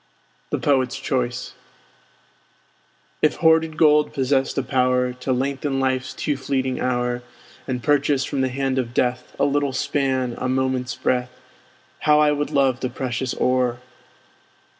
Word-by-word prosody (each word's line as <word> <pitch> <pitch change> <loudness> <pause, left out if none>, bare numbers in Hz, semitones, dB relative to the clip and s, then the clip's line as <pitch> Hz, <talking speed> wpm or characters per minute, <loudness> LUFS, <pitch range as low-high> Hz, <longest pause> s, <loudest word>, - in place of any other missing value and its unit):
THE - - -1
POET'S 130 -3 +1
CHOICE 125 -1 -2 1.7
If 155 - +3
hoarded 160 -1 +3
gold 150 -1 +4
possessed 135 0 0
a 135 - +1
power 125 -1 +1
To 125 +1 -4
lengthen 135 +2 -1
life's 130 -1 -1
too 145 - -1
fleeting 130 -1 -1
hour, 125 -1 -1 0.5
And 125 -3 -3
purchase 145 -2 +2
from 140 - -2
the 130 - +1
hand 135 0 -1
of 120 -1 -4
death 125 0 -1
A - - +2
little 145 -1 0
span, 130 -2 0
a 130 - -1
moment's 130 -2 -1
breath, 125 +1 -1 0.6
How 150 0 +4
I 150 -1 +4
would 145 0 -1
love 135 -3 +2
the 130 - -2
precious 125 0 -3
ore! 125 -1 +1
130 Hz, 140 wpm, -22 LUFS, 125-140 Hz, 1.7 s, gold